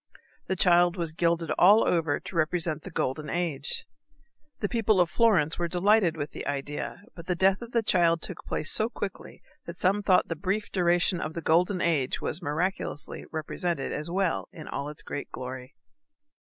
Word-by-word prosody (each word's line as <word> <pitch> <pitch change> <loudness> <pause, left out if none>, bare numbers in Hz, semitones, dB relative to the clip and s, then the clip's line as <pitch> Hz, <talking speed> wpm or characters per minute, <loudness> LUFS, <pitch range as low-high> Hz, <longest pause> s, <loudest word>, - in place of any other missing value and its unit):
The 190 - 0
child 175 -1 +4
was 170 -2 -2
gilded 170 0 0
all 205 +5 +6
over 160 -4 +1
to - - -10
represent 160 -1 0
the 190 - -9
Golden 150 -2 -2
Age. 165 -5 -2 0.7
The 205 - 0
people 220 -3 +2
of 175 -1 +3
Florence 180 -10 +3
were 175 - 0
delighted 180 -1 +3
with 145 0 -4
the - - -7
idea, 145 +6 -4
but 170 -1 -11
the 180 - 0
death 190 +3 +3
of 235 0 -8
the 230 -1 +1
child 170 -5 +3
took - - -7
place 155 - -1
so 220 +1 +2
quickly 200 -5 -7 0.2
that 170 +1 -7
some 195 +3 +2
thought 185 -2 +3
the 165 - -3
brief 195 +6 -2
duration 175 -1 +2
of 155 - -4
the 170 - -3
Golden 175 +4 +2
Age 150 -6 +1
was - - -3
miraculously 155 +1 -3
represented 160 -1 -3
as 150 - -4
well 185 0 -1
as 155 - -10 0.2
its 150 - -10
great 145 - -5
glory. 130 +1 -7
170 Hz, 180 wpm, -27 LUFS, 155-190 Hz, 0.7 s, all